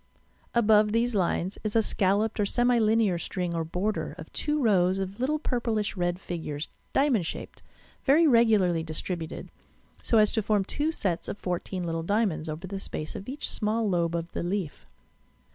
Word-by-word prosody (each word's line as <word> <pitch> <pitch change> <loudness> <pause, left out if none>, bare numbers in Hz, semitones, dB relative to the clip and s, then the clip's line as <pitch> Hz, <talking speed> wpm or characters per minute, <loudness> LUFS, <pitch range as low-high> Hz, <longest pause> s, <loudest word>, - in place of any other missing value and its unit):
Above 215 -2 +5
these 235 +1 +2
lines 185 -1 0
is 215 0 -2
a 225 - +4
scalloped 205 +3 +1
or - - +3
semi 245 +2 +3
linear 215 -5 +3
string 180 0 -3
or 165 -1 -1
border 180 +6 -2
of - - -11
two 300 0 -1
rows 190 -7 +3
of 195 +2 -4
little 280 +5 +1
purplish 230 -8 -1
red 175 -1 -1
figures, 160 -5 -5 0.2
diamond 270 -8 +2
shaped, 165 - -7 0.4
very 300 +5 +5
regularly 220 - +4
distributed, 160 +1 -5 0.5
so 230 - +2
as 215 -1 +6
to 220 - +1
form 205 -1 +1
two 295 +9 -1
sets 185 - -2
of - - -4
fourteen 180 0 -3
little 165 -1 -2
dia 205 +7 +2
monds 160 -4 -3
over 155 +4 -5
the 195 +1 -5
space 155 -4 -5
of 200 - -7
each 285 +3 -4
small 220 +1 0
lobe 170 -3 +1
of 170 0 -4
the - - -3
leaf. 175 -3 -3
200 Hz, 180 wpm, -27 LUFS, 175-225 Hz, 0.5 s, as